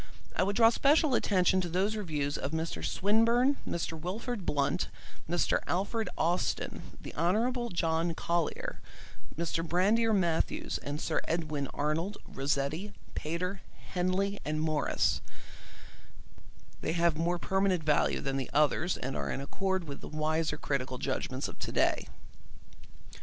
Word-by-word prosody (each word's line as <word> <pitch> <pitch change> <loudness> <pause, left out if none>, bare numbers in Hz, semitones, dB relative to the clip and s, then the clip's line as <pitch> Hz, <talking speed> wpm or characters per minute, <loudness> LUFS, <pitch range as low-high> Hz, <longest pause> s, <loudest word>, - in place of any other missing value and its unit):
I - - +2
would 200 +2 +1
draw 225 0 +7
special 290 +3 +4
attention 185 -4 +3
to 175 - -3
those 190 +5 +1
reviews 150 -8 -1
of - - -2
Mr. 160 +1 -2
Swinburne, 230 +7 +3
Mr. 170 -1 -2
Wilfrid 200 +4 -4
Blunt, 140 -1 +1 0.4
Mr. 175 0 +2
Alfred 200 +3 0
Austin, 160 - -1
the - - -8
Hon. 235 - +1
John 165 0 +1
Collier, 170 -1 -1 0.6
Mr. 165 0 -1
Brander 205 +7 +3
Matthews 175 -6 +1
and 145 +1 -4
Sir - - 0
Edwin 155 -4 -1
Arnold, 160 +7 -1
Rossetti, 145 +8 -1 0.2
Pater, 180 +5 -3 0.3
Henley 190 +2 0
and 155 0 -1
Morris; 155 -2 +1 1.6
they 160 - -1
have 170 -1 +3
more 170 +3 +1
permanent 190 -1 +1
value 150 -1 +2
than 135 0 -1
the 135 - -3
others, 150 +4 +2
and 135 +2 -4
are - - -2
in - - -2
accord 190 +6 -1
with 145 -4 -7
the - - -7
wiser 155 0 0
critical 130 -3 -2
judgments - - -2
of - - -10
to - - -3
day. - - +2
170 Hz, 135 wpm, -31 LUFS, 155-195 Hz, 1.6 s, draw